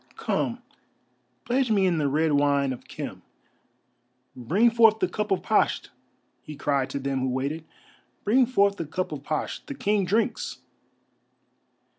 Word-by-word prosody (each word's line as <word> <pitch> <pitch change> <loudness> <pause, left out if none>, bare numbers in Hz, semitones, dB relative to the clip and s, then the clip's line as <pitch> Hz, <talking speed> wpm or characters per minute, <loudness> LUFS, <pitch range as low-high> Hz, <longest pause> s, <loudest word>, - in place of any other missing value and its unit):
Come, - - -2 0.8
pledge 250 +2 +1
me 200 -3 +3
in 175 -3 +2
the 145 - +1
red 155 +3 +1
wine 140 -2 +2
of 125 - -12
Khem. - - -7 1.1
Bring 190 - +2
forth 225 -2 +5
the - - +1
cup 210 0 -3
of 195 - 0
Pasht!" - - +1 0.5
he 155 - -9
cried 140 -2 0
to 140 - -3
them 135 0 -2
who 130 0 -1
waited, 140 +5 -3 0.6
"bring 245 +4 +4
forth 200 -5 +2
the 165 - -3
cup 180 +3 -3
of 150 -3 -5
Pasht, 150 +1 -4
the 285 - -6
King 210 -6 +1
drinks!" 220 +5 -1
165 Hz, 150 wpm, -26 LUFS, 140-215 Hz, 1.1 s, forth